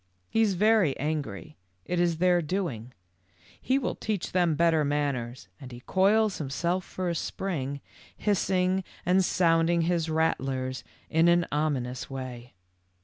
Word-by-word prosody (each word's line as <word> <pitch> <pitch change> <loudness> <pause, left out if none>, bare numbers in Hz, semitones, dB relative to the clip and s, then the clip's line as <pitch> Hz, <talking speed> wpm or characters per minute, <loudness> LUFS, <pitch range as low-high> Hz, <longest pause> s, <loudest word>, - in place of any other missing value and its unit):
He 225 - +2
is 205 -4 +2
very 210 -6 +3
angry. 140 - -4 0.3
It 180 - -1
is 170 -2 +2
their 180 0 +3
doing; 150 - -3 0.7
he 260 - +1
will 275 - -1
teach 210 -5 -3
them 175 -3 +2
better 165 -1 +3
manners, 140 -6 -2
and 130 -2 -10
he 120 0 -10
coils 205 - +2
himself 170 +6 -1
for 185 0 -5
a 170 - 0
spring, 145 -5 -3 0.4
hissing 190 -2 +1 0.2
and 185 +2 +4
sounding 170 -1 +2
his 165 -1 0
rattlers 130 -6 -1 0.3
in 160 +1 +4
an 170 0 +4
ominous 140 -5 -2
way. 125 -2 -7
165 Hz, 140 wpm, -27 LUFS, 135-185 Hz, 0.7 s, and